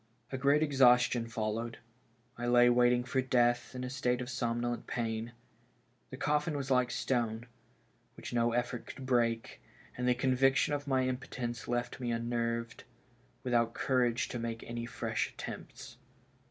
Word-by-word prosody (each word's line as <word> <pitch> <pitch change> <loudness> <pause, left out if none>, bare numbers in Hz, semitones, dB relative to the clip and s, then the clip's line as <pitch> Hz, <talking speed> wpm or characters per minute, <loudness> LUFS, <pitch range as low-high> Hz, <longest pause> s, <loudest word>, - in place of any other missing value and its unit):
A 130 - -2
great 140 +3 +4
exhaustion 125 -4 +4
followed. 115 +1 -3 0.6
I 120 0 -4
lay 120 0 +6
waiting 120 0 +4
for 130 +1 0
death 120 -1 +1
in 125 - -4
a 125 - -3
state 125 -2 0
of 125 0 -5
somnolent 120 0 -2
pain. 115 0 -3 0.8
The 130 - -8
coffin 150 +2 0
was 135 -1 -4
like 125 -1 +3
stone, 120 -3 -1 0.7
which - - -8
no 120 0 +2
effort 120 0 -2
could 135 - -8
break, 115 -3 0 0.3
and 125 0 -2
the 125 - +4
conviction 130 +2 +2
of 145 0 -3
my 130 -1 +2
impotence 125 -2 -4
left 120 +1 -2
me 125 -2 -2
unnerved, 115 0 -2 0.6
without 120 -2 +1
courage 125 -2 +1
to 120 - -4
make 115 0 -4
any 120 0 -5
fresh - - -2
attempts. - - -8
120 Hz, 150 wpm, -32 LUFS, 115-130 Hz, 0.8 s, lay